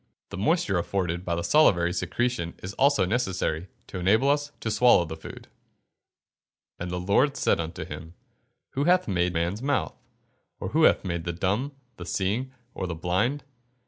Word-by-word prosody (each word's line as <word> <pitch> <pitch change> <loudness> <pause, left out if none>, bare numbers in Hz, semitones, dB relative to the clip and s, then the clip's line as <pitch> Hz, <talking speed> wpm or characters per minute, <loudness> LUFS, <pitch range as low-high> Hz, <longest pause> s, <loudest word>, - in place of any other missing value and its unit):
The 100 - -7
moisture 110 - +1
afforded 90 -1 -2
by 85 -2 -1
the 85 - -2
salivary 85 - +4
secretion 115 -2 -1
is 95 +2 -5
also 140 -2 +3
necessary 95 -6 -1 0.2
to 90 - -6
enable 110 +10 +3
us 145 0 -1
to 110 - -2
swallow 105 -4 +5
the 80 0 -6
food. 80 - -10
[Verse: - - -23 1.3
"And 90 - -4
the 90 0 -3
Lord 125 +10 +2
said - - +2
unto 85 0 -4
him, 80 +2 -9 0.6
Who 140 +2 -1
hath 180 +2 +3
made 90 -3 +1
man's 85 +6 -1
mouth? 140 +2 0 0.7
or - - -4
who - - +6
maketh 85 -2 -3
the 85 - -2
dumb, 100 - -1
or - - -34 0.2
the 85 - -7
seeing, 110 +8 -1 0.2
or 95 - -4
the 85 - -4
blind? 100 - 0
95 Hz, 175 wpm, -26 LUFS, 85-125 Hz, 1.3 s, who